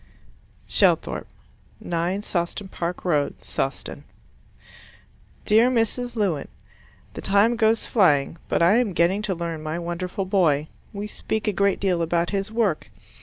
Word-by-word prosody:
Shelthorpe, - - +2 0.5
9 175 +4 -2
Sawston 185 +1 -3
Park 175 +2 -4
Road, 150 -5 0
Sawston 135 0 -4 1.4
Dear 225 +4 +5
Mrs. 245 0 -1
Lewin, 190 -10 0 0.7
The - - -7
time 200 +4 +3
goes 225 -1 +2
flying, 165 - +3
but - - +2
I 190 +6 +5
am 235 -6 +1
getting 175 +5 +2
to 205 -3 -1
learn 165 -2 -4
my 155 +1 -3
wonderful 175 +3 -3
boy. 160 -6 +2 0.2
We 205 0 -5
speak 215 +1 -4
a 210 - +2
great 200 +1 +2
deal 185 -3 +1
about 170 +1 0
his 200 +1 -2
work. 220 -8 0
190 Hz, 135 wpm, -24 LUFS, 170-210 Hz, 1.4 s, Dear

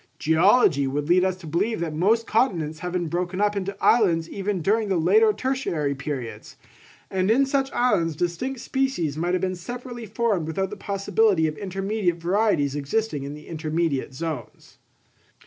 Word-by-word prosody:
Geology 160 - +4
would 145 +2 -2
lead 180 +2 +4
us 185 -1 +1
to 185 -2 -13
believe 185 +8 -1
that 165 -2 -3
most 215 +9 +2
continents 170 - 0
have 180 +1 -4
been 175 -1 -1
broken 180 +3 -2
up 210 0 +2
into 200 0 -3
islands 170 -8 +3
even 200 -1 -2
during 215 +3 +2
the 190 - +2
later 435 - +4
tertiary 255 - -1
periods; 130 -6 -6 0.6
and 190 0 0
in 260 +5 +4
such 270 0 0
islands 175 -10 +1
distinct 175 - -2
species 265 - -1
might 175 +3 0
have 180 - -1
been 185 -1 0
separately 240 +5 -7
formed 210 -6 0
without 190 +4 -2
the - - -5
possibility 200 -2 +1
of 155 -1 -1
intermediate 195 0 -1
varieties 175 -5 +1
existing 145 +2 -1
in 145 +1 -6
the 150 - -12
intermediate 160 -3 -2
zones. 155 -4 -6
185 Hz, 165 wpm, -24 LUFS, 160-220 Hz, 0.6 s, Geology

